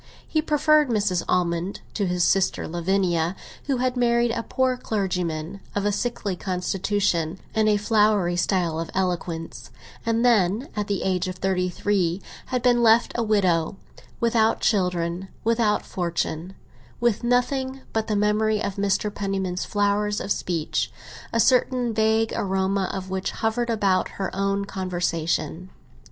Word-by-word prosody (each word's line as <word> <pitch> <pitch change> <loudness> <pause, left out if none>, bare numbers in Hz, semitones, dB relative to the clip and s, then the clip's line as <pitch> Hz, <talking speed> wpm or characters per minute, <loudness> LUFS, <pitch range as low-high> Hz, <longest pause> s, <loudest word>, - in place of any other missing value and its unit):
He 310 - +1
preferred 305 -1 +3
Mrs. 205 -6 +1
Almond 175 +1 0
to 200 -3 -1
his 180 0 +1
sister 190 +2 +2
Lavinia, 175 0 0 0.3
who 275 -2 0
had 255 0 0
married 235 -1 +2
a 230 0 -1
poor 260 +2 0
clergyman, 180 -6 -2 0.2
of 205 0 0
a 205 - +2
sickly 205 -2 -2
constitution 185 -2 -1 0.2
and 220 -1 +3
a 210 - +4
flowery 210 -4 +2
style 175 -2 0
of 165 -1 -4
eloquence, 175 -3 -3 0.3
and 230 +1 +1
then, 220 +2 +3
at 210 -1 -2
the 200 -2 -1
age 185 -1 0
of 185 - -4
thirty 185 -1 0
three, 180 -2 0 0.3
had 250 -2 -2
been 245 -1 +4
left 230 0 +5
a 240 - -1
widow, 190 -6 +2 0.4
without 230 -2 +2
children, 180 -3 0 0.2
without 225 -2 +2
fortune—with 170 - -3
nothing 260 +2 0
but 220 -1 0
the 215 - 0
memory 210 +1 +2
of 200 - -3
Mr. 200 +1 0
Penniman's 190 -3 -2
flowers 205 0 +1
of 200 - -4
speech, 165 -5 -1 0.4
a 230 - 0
certain 250 -1 +3
vague 220 +1 +2
aroma 190 0 0
of 190 -1 -5
which 190 0 -1
hovered 230 +2 -1
about 200 -5 +1
her 195 -1 -3
own 195 0 0
conversation. 175 -2 -2
200 Hz, 140 wpm, -24 LUFS, 180-225 Hz, 0.4 s, left